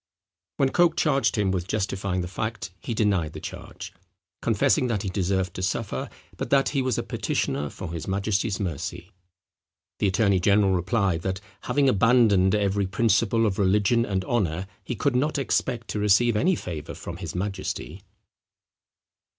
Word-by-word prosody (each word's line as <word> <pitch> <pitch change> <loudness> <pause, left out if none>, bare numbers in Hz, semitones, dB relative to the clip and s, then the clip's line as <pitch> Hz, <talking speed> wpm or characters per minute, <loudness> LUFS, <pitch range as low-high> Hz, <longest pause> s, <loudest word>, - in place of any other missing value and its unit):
When 135 - +3
Coke 175 -2 +3
charged 135 -7 +2
him 100 -3 +1
with 90 -2 -2
justifying 95 -2 -1
the 90 - -4
fact 110 0 -4
he 115 +5 -4
denied 95 -8 +1
the - - -7
charge, - - -8 0.5
confessing 125 - +2
that 105 -5 -1
he 100 - -2
deserved 95 -1 -1
to - - -6
suffer, 95 - -2 0.3
but - - -4
that 140 -1 +3
he 140 - 0
was 130 -3 0
a - - -1
petitioner 75 0 -2
for 85 +3 -7
his 85 - -5
majesty's 100 +1 0
mercy. 90 0 -4 0.9
The 105 - +2
attorney 100 -1 +2
general 100 +1 +3
replied, 95 -1 +1
that, 95 +1 -2 0.3
having 145 -1 +2
abandoned 105 -5 +4
every 100 -1 +1
principle 115 +2 +2
of 100 -2 -1
religion 105 +4 +3
and 95 -4 -2
honour, 95 -6 0 0.2
he 125 - -4
could 125 +5 0
not 145 +4 +1
expect 120 -3 -1
to 105 - -2
receive 105 +3 +4
any 175 - +3
favour 80 - -6
from - - -7
his - - -6
majesty. 95 -2 -4
100 Hz, 160 wpm, -25 LUFS, 95-115 Hz, 0.9 s, abandoned